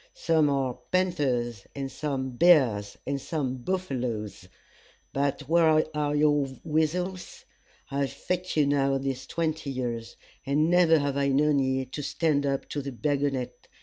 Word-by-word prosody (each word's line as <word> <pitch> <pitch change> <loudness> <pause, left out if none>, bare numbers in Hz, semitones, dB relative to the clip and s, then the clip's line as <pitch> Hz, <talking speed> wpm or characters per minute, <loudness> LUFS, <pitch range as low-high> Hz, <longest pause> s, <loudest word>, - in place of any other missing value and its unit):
Some 160 -3 +2
are 135 -3 -1
panthers, 135 - 0
and 135 -1 -4
some 135 -2 -3
bears, 120 -9 +4
and 140 0 -2
some 135 -5 -2
buffaloes; 125 - -3 0.6
but 140 +1 0
where 160 -1 +4
are 150 -1 0
your 145 -1 +3 0.2
weasels? 175 +4 -2 0.5
I 140 - -2
have 140 -1 0
fit 180 -1 -3
you 150 - +5
now 140 -1 +2
these 135 -1 -4
twenty 160 -3 -2
years, 120 -3 -4 0.3
and 150 +4 +1
never 175 -2 +5
have 140 -2 -1
I 140 0 +2
known 145 +1 +3
ye 130 0 0
to 130 +3 -6
stand 145 -1 0
up 135 -1 -1
to 145 - -3
the 140 0 -5
baggonet. 140 -1 -2
140 Hz, 150 wpm, -27 LUFS, 130-155 Hz, 0.6 s, you